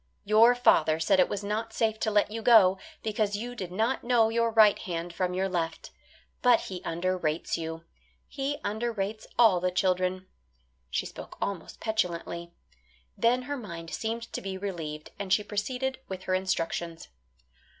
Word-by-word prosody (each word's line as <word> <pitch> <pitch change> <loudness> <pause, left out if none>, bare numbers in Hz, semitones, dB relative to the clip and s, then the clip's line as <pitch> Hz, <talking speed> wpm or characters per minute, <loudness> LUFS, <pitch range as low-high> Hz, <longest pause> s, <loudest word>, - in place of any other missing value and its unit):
Your 220 +4 +6
father 160 -10 +4
said 185 +4 +3
it 180 - +4
was 205 0 -3
not 220 +2 -3
safe 220 -1 0
to 220 - 0
let 210 0 +2
you 225 +1 -4
go, 205 -5 +6 0.2
because 210 -1 0
you 240 +4 -4
did 185 -7 -6
not 225 +7 0
know 235 -2 +4
your 230 0 +1
right 215 -2 +5
hand 170 -1 -4
from 180 +1 -1
your 190 +1 +1
left. 170 -3 -3 0.5
But 245 -2 +5
he 185 -2 -6
under 185 +3 -1
rates 160 -3 -1
you. 165 0 -5 0.4
He 280 +1 -3
under 220 +4 -1
rates 215 0 -4
all 220 -7 +6
the 180 +1 +1
children." 185 0 0 0.6
She - - -1
spoke - - -9
almost 195 -4 -4
petulantly. 170 -5 -2 0.6
Then 245 +2 +2
her 285 +2 -4
mind 170 -8 -8
seemed 230 +1 -3
to - - -3
be 190 -1 -4
relieved, 165 -6 -5
and 200 -2 -4
she 210 +2 +4
proceeded 255 +6 -2
with 185 -1 -6
her 185 - -1
instructions. 170 -3 -2
200 Hz, 170 wpm, -28 LUFS, 180-225 Hz, 0.6 s, Your